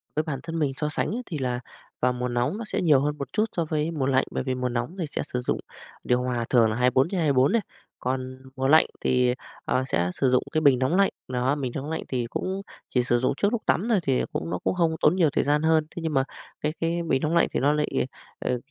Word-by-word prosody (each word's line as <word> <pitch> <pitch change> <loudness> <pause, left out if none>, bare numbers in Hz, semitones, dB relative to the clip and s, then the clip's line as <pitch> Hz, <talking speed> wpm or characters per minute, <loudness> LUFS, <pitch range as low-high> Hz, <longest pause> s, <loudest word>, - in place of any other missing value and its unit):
Với 155 - +1
bản 150 -4 -3
thân 165 0 -4
mình 145 -3 +1
so 150 - -1
sánh 155 - -1
ấy 250 - -3
thì 165 - -5
là 125 -3 -1 0.4
vào 125 0 +3
mùa 125 0 -2
nóng 120 +9 0
nó 230 - -4
sẽ - - -2
nhiều 155 -6 +5
hơn 150 +1 -1
một 140 -2 -6
chút 215 - +2
so 170 - +1
với 155 +1 -1
mùa 150 -5 -1
lạnh, 130 -1 +3
bởi - - -2
vì 130 -1 -1
mùa 125 0 -1
nóng 120 +8 -3
thì 170 - 0
sẽ - - -3
sử 125 - -3
dụng - - -1 0.4
điều 125 0 +2
hòa 120 -2 -1
thường 115 -3 +5
là 110 - -1
24/24 135 - +3
đấy, 230 - +3 0.4
còn 130 0 -3 0.2
mùa 135 0 0
lạnh 155 +3 +7 0.2
thì, 125 -1 +3 0.3
ờ, 130 - +1
sẽ 90 -7 +1
sử 135 - +1
dụng 125 - +3
cái 155 - +1
bình 140 -5 +5
nóng 130 +6 +1
lạnh, 195 +1 +4 0.2
nó, 130 +2 0
bình 135 -4 -3
nóng 140 +2 -4
lạnh 160 - -3
thì 125 -2 -1
cũng 190 +8 -3 0.3
chỉ 125 - +2
sử 120 0 +2
dụng 130 - +1
trước 205 - +2
lúc 235 -2 -1
tắm 215 +7 +1
thôi, 220 -4 +4
thì 135 -3 +2
cũng 150 +2 -3
nó - - -2
cũng - - +1
hông 165 -2 +2
tốn 150 +4 +5
nhiều 170 -5 +4
thời - - +1
gian 145 +1 +2
hơn. 160 -1 +3
Thế 170 - -4
nhưng 160 -1 -2
mà 135 -1 +3 0.4
cái 150 +1 -1
cái 165 +1 0
bình 135 -4 +2
nóng 155 +2 0
lạnh 170 - +4
thì - - 0
nó 145 +2 +3
lại, 150 -3 0 0.3
ờ, 125 - -1
140 Hz, 265 wpm, -26 LUFS, 125-160 Hz, 0.4 s, lạnh